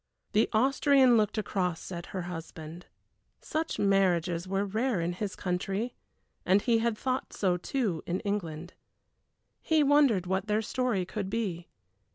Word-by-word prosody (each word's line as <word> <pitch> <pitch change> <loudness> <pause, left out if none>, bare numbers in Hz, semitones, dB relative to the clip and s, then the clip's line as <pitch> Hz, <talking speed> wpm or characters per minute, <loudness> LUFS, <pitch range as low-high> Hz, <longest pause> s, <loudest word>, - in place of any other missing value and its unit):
The 215 +1 +3
Austrian 265 +2 +4
looked 215 -1 +2
across 185 -5 -2
at 170 -1 -6
her 185 -2 -4
husband. 165 -1 -8 0.5
Such 320 +1 -3
marriages 180 -3 +2
were 195 +1 0
rare 220 +2 0
in 170 +1 -1
his 195 +2 -4
country, 195 +6 -2 0.5
and 190 +2 +4
he 230 +1 +2
had 230 -1 0
thought 260 +2 -2
so 185 -3 +1
too 185 -2 -2
in 180 +2 -1
England. 175 -5 -4 0.9
He 315 -2 +3
wondered 280 -10 +4
what 190 +3 -1
their 215 +1 +1
story 230 -5 0
could 195 +1 -4
be. 195 -6 -3
195 Hz, 145 wpm, -29 LUFS, 180-230 Hz, 0.9 s, Austrian